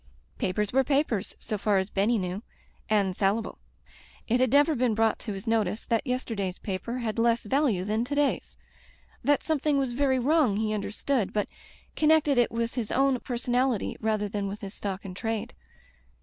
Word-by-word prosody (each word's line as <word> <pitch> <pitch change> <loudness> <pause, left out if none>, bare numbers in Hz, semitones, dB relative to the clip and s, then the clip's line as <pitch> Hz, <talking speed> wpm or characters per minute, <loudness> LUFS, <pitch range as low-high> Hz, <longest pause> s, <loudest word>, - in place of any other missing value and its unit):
Papers 200 +3 -1
were 270 +1 +4
papers, 270 -7 0
so 215 - -3
far 205 0 +2
as 190 +2 -1
Benny 210 +4 +2
knew, 185 0 -3 0.5
and 200 -4 +2
salable. 205 +3 0 0.7
It 245 +2 +2
had 255 -1 +3
never 290 +3 +5
been 245 -4 +1
brought 225 0 +2
to 210 - -5
his 195 +2 -7
notice 220 -3 0
that 230 +4 0
yesterday's 220 -7 -2
paper 210 +5 -4
had 230 -2 -2
less 235 0 +3
value 220 -6 +1
than 215 +3 0
to 285 +3 -3
day's. 290 -1 0 0.7
That 290 0 +2
something 300 -2 +1
was 270 -3 0
very 265 +1 +2
wrong 260 -4 +3
he 215 0 0
understood, 215 +2 -1
but 210 -1 0 0.5
connected 305 -3 +4
it 240 - +3
with 230 0 -2
his 235 -4 -3
own 270 -1 +2
personality 245 -1 0
rather 215 -1 0
than 200 0 -3
with 200 +2 -6
his 195 0 -6
stock 195 -1 -5
in 185 - -6
trade. 225 +2 -3
225 Hz, 175 wpm, -27 LUFS, 205-260 Hz, 0.7 s, never